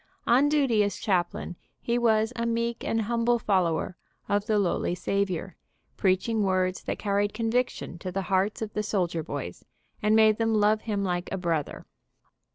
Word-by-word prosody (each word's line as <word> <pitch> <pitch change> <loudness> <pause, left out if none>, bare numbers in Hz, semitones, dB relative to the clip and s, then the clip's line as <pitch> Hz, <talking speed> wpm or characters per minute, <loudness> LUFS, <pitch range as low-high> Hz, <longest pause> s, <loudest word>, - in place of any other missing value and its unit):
On 265 +5 +4
duty 275 -8 +3
as 205 - -1
chaplain 175 -3 -1 0.2
he 240 +1 0
was 220 0 +2
a 235 -1 -1
meek 235 0 -1
and 225 0 0
humble 235 +2 +1
fol 195 -5 +2
lower 165 +2 -2 0.3
of 205 +1 0
the 215 - +2
lowly 180 -2 0
Savior, 190 -1 -2 0.4
preaching 200 +4 +1
words 185 -1 +1
that - - -2
car 200 -1 -1
ried 205 0 0
conviction 230 -6 -1
to 185 - -5
the 195 +1 -2
hearts 195 +4 0
of 210 - -6
the 210 - -1
soldier 180 -6 -1
boys, 140 - -6 0.4
and 210 +1 +3
made 220 -1 +5
them 225 -1 +2
love 215 +1 +3
him 205 -3 -2
like 180 -1 -2
a 195 - -1
brother. 165 -5 -2
205 Hz, 175 wpm, -27 LUFS, 185-225 Hz, 0.4 s, made